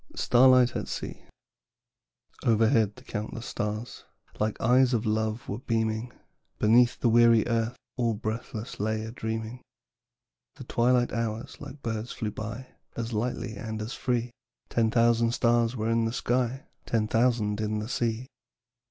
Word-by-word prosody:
STARLIGHT 125 0 +5
AT - - -3
SEA. - - -6 1.2
Overhead 110 -2 +3
the - - -15
countless 110 +3 -5
stars 105 +3 -4 0.4
Like 105 0 -1
eyes 125 +1 +4
of 115 0 -1
love 110 +1 -1
were 105 - -4
beaming, 110 0 -1 0.5
Underneath 120 +3 +4
the - - +2
weary 115 -1 +5
Earth 115 0 0 0.2
All 115 -3 +1
breathless 110 +1 -5
lay 110 +1 -1
a 110 - -6
dreaming. 110 +1 -4 0.9
The - - -9
twilight 120 +1 +2
hours 115 0 -3
like 145 0 -10
birds 115 0 -3
flew 110 -3 -3
by, 115 +5 -6 0.3
As 115 0 -4
lightly 115 +1 -2
and 110 +1 -5
as 110 +3 -4
free; 120 -1 -1 0.4
Ten 115 -1 +2
thousand 115 0 +3
stars 120 0 +2
were 110 -1 -1
in 115 0 +2
the 115 - -2
sky, 130 +3 -1 0.2
Ten 110 -2 +1
thousand 110 -2 +1
in 110 0 -1
the 105 0 -3
sea. 120 0 -1
115 Hz, 145 wpm, -27 LUFS, 110-120 Hz, 1.2 s, STARLIGHT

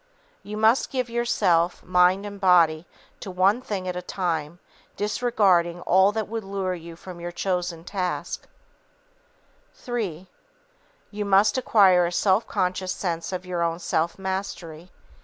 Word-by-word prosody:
_You 210 +1 -6
must 220 +4 +3
give 255 -3 -2
yourself, 180 -8 +1
mind 180 +2 +3
and 200 -1 -8
body, 170 -3 +4 0.3
to - - -7
one 190 +6 +2
thing 195 -6 -4
at 180 - -3
a 180 - -3
time, 170 -3 -3 0.4
disregarding 200 -6 +1
all 190 +3 +4
that 220 -1 -2
would 225 0 -4
lure 195 -1 -3
you 170 -1 -9
from 175 +1 -10
your 175 0 -5
chosen 175 -2 -2
task_. 185 -2 -3 1.5
III. 200 -8 -3 0.9
_You 210 0 -3
must 200 +1 +4
acquire 195 -8 +4
a - - -4
self 195 +4 +2
conscious 185 0 -1
sense 170 -2 -3
of 185 0 -5
your 180 -1 -3
own 165 0 0
self 170 -1 -1
mastery. 190 -3 -5
185 Hz, 140 wpm, -24 LUFS, 175-205 Hz, 1.5 s, body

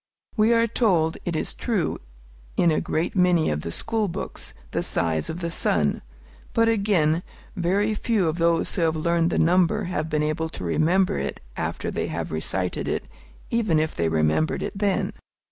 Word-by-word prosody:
We 220 0 +4
are 230 0 +4
told, 185 -9 +2
it 175 - -2
is - - -2
true, 210 -10 -1 0.6
in 170 - +4
a 155 - +1
great 165 +5 -1
many 180 - +3
of 75 0 -2
the 85 - -5
school 220 - 0
books, 170 - -6 0.2
the - - 0
size 80 -2 0
of 170 +3 -5
the 170 -1 -2
sun; 80 - +1 0.5
but, 230 0 +3
again, 195 -8 +2 0.3
very 200 +4 +1
few 210 -4 +1
of 160 +2 -1
those 165 0 +2
who 180 - -1
have 160 -1 +2
learned 170 +1 +1
the - - -1
number 185 +5 +3
have 160 -4 -2
been 150 -1 +1
able 160 +2 -1
to 160 - -8
remember 165 - +2
it 70 - -3 0.2
after - - -3
they - - -2
have - - -4
recited 90 +3 -2
it, - - -2 0.5
even 215 -9 +2
if 155 0 -1
they 85 -1 0
remembered 80 - +1
it - - -4
then. 200 -1 0
170 Hz, 180 wpm, -24 LUFS, 155-200 Hz, 0.6 s, We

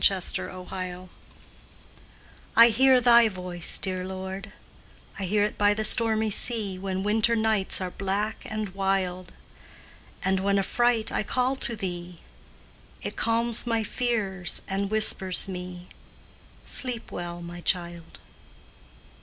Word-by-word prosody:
THE 195 -1 +4 0.2
DIVINE 185 0 -6
LULLABY 185 -1 -7 1.5
I 230 +1 +8
hear 260 +3 +4
Thy 235 -2 +5
voice, 180 -3 +1
dear 185 -1 -3
Lord; 190 +2 -7 0.7
I 195 - -2
hear 205 +3 +1
it 210 - -3
by 205 0 +3
the 215 - -2
stormy 220 -1 +5
sea 205 -4 +2
When 190 0 -4
winter 220 +3 +1
nights 220 -3 0
are 185 -1 -5
black 200 +3 -3
and 215 -1 -4
wild, 190 -1 -2 0.9
And 190 0 +1
when, 200 +1 0
affright, 230 +3 +1
I - - -1
call 250 +5 -1
to 235 - 0
Thee; 175 -3 -6 0.8
It - - -4
calms 230 +1 +2
my 230 -1 0
fears 205 -7 -1
and 195 0 -2
whispers 200 -4 +2
me, 180 -1 -8 0.8
"Sleep 250 -4 0
well, 175 0 -7
my 175 +1 -9
child." 170 -2 -3
195 Hz, 130 wpm, -25 LUFS, 185-220 Hz, 1.5 s, I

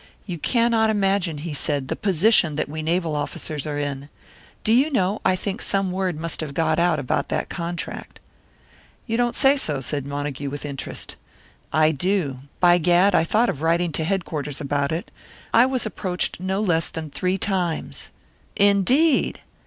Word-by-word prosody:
"You 175 -5 -5
cannot 230 +2 +2
imagine," 195 -6 +1
he 155 +1 -5
said, 145 -2 -1
"the - - -2
position 190 -4 +3
that 155 - -1
we 155 +2 -5
naval 165 0 0
officers 150 0 -3
are 145 -1 -3
in. 145 -1 -4 0.5
Do 220 - +3
you 265 +6 +4
know, 200 -4 0
I 185 - +3
think 200 +4 -4
some 195 -2 +1
word 185 -4 -2
must 165 0 -3
have 145 -3 -5
got 160 -1 +1
out 170 -2 +3
about 140 0 -1
that - - -2
contract." 170 -1 -5 0.9
"You 230 - -2
don't 240 0 +1
say 270 0 +5
so," 150 - 0
said 140 +1 -3
Montague, 145 -1 -4
with 145 +1 -6
interest. 140 -2 -6 0.5
"I 155 +1 +4
do. 160 -4 -1 0.2
By 175 0 +5
gad, 175 +4 +4
I - - +4
thought 220 +8 +2
of 145 - -4
writing 170 +1 +1
to 160 - -1
headquarters 155 -6 -2
about 140 0 -1
it. 165 +2 -4 0.4
I 235 +3 +6
was 260 -3 -1
approached 185 -5 -2
no 190 +2 -1
less 170 -6 +1
than 160 -2 -6
three 185 +4 0
times!" 180 -5 -2 0.5
"Indeed!" 225 - +3
175 Hz, 170 wpm, -23 LUFS, 150-200 Hz, 0.9 s, I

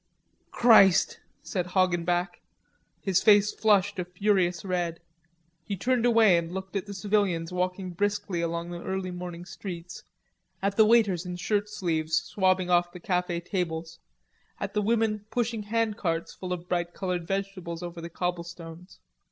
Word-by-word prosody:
"Christ!" 215 -6 +5 0.2
said 180 -5 -2
Hoggenback. 175 -1 0 0.6
His 195 -2 +2
face 205 -1 +5
flushed 205 -2 +2
a 180 - -1
furious 180 -1 +1
red. 175 -3 -1 0.6
He 200 +2 -4
turned 245 +3 +1
away 220 -7 +5
and 165 0 -6
looked 190 +2 -6
at 195 +1 -2
the 200 - -6
civilians 190 -5 0
walking 185 +1 -2
briskly 200 -1 -1
along 170 +1 -3
the 175 0 -6
early 190 0 -3
morning 175 -1 -7
streets, 175 -2 -8 0.6
at 200 0 -1
the 220 0 +6
waiters 210 -7 +4
in 180 - -4
shirt 205 +3 -1
sleeves 160 -6 -1
swabbing 185 -2 +1
off 175 0 +3
the 180 - -10
cafe 180 -1 -1
tables, 170 -3 -3 0.6
at - - -4
the 210 - +1
women 215 -1 0
pushing 230 -1 -1
handcarts 210 -7 -1
full 185 -1 -6
of 180 -1 -4
bright 175 -1 -2
colored 180 -3 -3
vegetables 190 -3 -4
over 175 -1 -6
the 170 - -6
cobblestones. 175 0 -6
180 Hz, 150 wpm, -27 LUFS, 175-205 Hz, 0.6 s, the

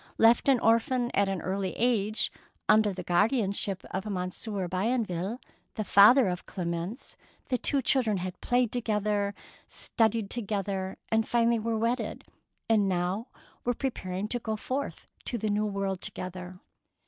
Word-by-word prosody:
Left 230 +4 +5
an 260 -3 +5
orphan 240 +2 +2
at 200 -1 +2
an 190 -3 -3
early 190 0 -2
age, 220 -3 +1 0.4
under 215 -1 +5
the 185 -1 -6
guardianship 200 0 +1
of 190 +3 -3
Monsieur 185 +1 -3
Bienville, 200 +1 -1 0.4
the 215 - -1
father 215 +6 +7
of 180 -1 -3
Clemence, 175 +5 -4 0.3
the 250 -2 +1
two 275 -2 +1
children 235 -6 +2
had 180 0 -5
played 245 -2 +2
together, 210 -3 0 0.3
studied 225 -2 0
together, 200 -4 -2
and 220 0 +2
finally 235 -1 +3
were 225 0 -1
wedded, 230 +3 -1 0.4
and 210 -3 +3
now 185 +5 -1 0.4
were 245 0 0
preparing 200 -7 -3
to 245 - -1
go 220 -1 -2
forth 260 +6 -4 0.2
to 240 - -1
the 215 -1 -1
New 210 +1 +1
World 195 -2 -2
together. 185 0 -6
210 Hz, 145 wpm, -29 LUFS, 190-235 Hz, 0.4 s, father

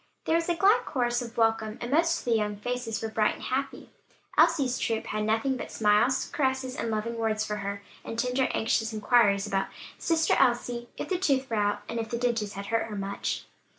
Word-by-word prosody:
There - - +1
was 335 +1 +1
a 345 - +2
glad 395 +7 +4
chorus 240 -2 0
of 235 -1 -8
welcome, 225 -1 +1
and 240 +1 -5
most 330 +3 +3
of - - -9
the 240 - 0
young 210 -1 0
faces 245 0 -3
were 225 - -2
bright 215 -1 +1
and - - -12
happy. 275 +2 -3 0.4
Elsie's 305 -6 +3
troop 225 -1 -1
had 215 0 -2
nothing 225 +5 +1
but - - -6
smiles, 215 +4 +3
caresses 265 -2 0
and 230 - -2
loving 225 +2 -2
words 215 -1 0
for 210 - -3
her, 200 0 -4 0.2
and 225 - -6
tender, 250 +2 +1
anxious 225 0 0
inquiries 210 -2 +3
about 195 -2 0 0.3
"Sister 325 -2 +2
Elsie; 240 -1 +1
if - - -4
the 370 -2 0
tooth 270 -7 +1
were 225 - 0
out?" 205 0 0
"if 230 -1 -3
the 235 - -2
dentist 230 -4 -1
hurt 200 0 -5 0.2
her 215 - -6
much?" 200 0 -3
235 Hz, 205 wpm, -28 LUFS, 215-260 Hz, 0.4 s, glad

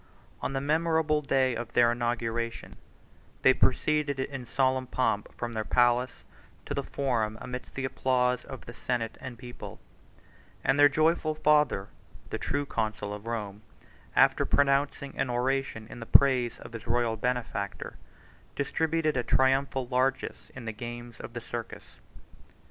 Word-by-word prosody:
93 - - -4
On - - -6
the 135 - -1
memorable 160 0 +2
day 135 -3 +2
of 120 0 -5
their 120 -1 +5
inauguration, 120 -1 -2 0.7
they - - +7
proceeded 150 -3 +1
in 130 -2 -4
solemn 130 0 +1
pomp 115 -5 0
from 120 -1 -5
their 110 -1 -1
palace 125 +2 +2 0.4
to - - -3
the - - 0
forum 115 -6 -1
amidst 125 0 -7
the 135 - -2
applause 125 -1 +1
of 130 - -9
the 115 - -8
senate 115 -1 -2
and 130 -2 -7
people; 120 0 -9 0.8
and 135 +2 +2
their 145 0 +8
joyful 155 +1 +2
father, 150 -10 +3 0.4
the - - -2
true 145 0 -1
consul 110 -5 -2
of 105 +2 -8
Rome, 105 -3 -4 0.5
after - - +5
pronouncing 140 0 +1
an 135 - +1
oration 125 -2 -1
in 120 - -10
the 115 - -8
praise 130 -4 +5
of - - -11
his 115 -1 -8
royal 120 -1 +1
benefactor, 115 -3 -3 0.6
distributed 160 +2 0
a 125 - +2
triumphal 130 0 +2
largess 130 +1 -1
in 125 -3 -8
the 110 - -2
games 120 +1 -8
of - - -8
the - - -5
circus. - - -7
125 Hz, 150 wpm, -29 LUFS, 115-140 Hz, 0.8 s, their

